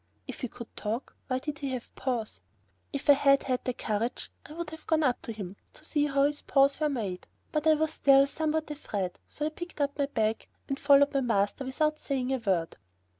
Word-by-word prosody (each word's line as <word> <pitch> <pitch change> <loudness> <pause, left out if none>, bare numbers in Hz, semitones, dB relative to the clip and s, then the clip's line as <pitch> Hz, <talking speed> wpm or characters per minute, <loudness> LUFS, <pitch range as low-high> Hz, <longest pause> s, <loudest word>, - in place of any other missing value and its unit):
If - - -7
he 250 - -1
could 235 0 -11
talk, 225 +5 -4
why 255 - 0
did 290 +2 -5
he 280 - -3
have 250 -2 -6
paws? 240 -5 -3 0.5
If 280 +1 -5
I 290 - +10
had 275 0 +4
had 255 -2 -1
the 255 - 0
courage, 220 +1 -2 0.2
I 300 - -10
would 335 -1 -5
have 320 0 -11
gone 320 -1 +3
up 255 -4 +1
to - - -6
him 200 -3 -7 0.2
to - - -13
see 295 -1 +1
how 275 -1 +2
his 290 +1 +1
paws 275 +1 +3
were 305 -1 +2
made, 205 -10 -3 0.2
but 305 0 0
I 315 - +7
was 315 +1 0
still 275 0 +6
somewhat 310 +1 -1
afraid, 200 -11 -4
so 295 - -4
I - - +1
picked 345 +1 -8
up 285 0 -1
my 280 - +2
bag 220 -5 -1 0.2
and 275 0 -2
followed 285 0 +5
my 275 - +2
master, 225 +2 +1
without 305 +4 0
saying 265 -2 -1
a - - +2
word. 185 -7 0
275 Hz, 225 wpm, -29 LUFS, 235-300 Hz, 0.5 s, I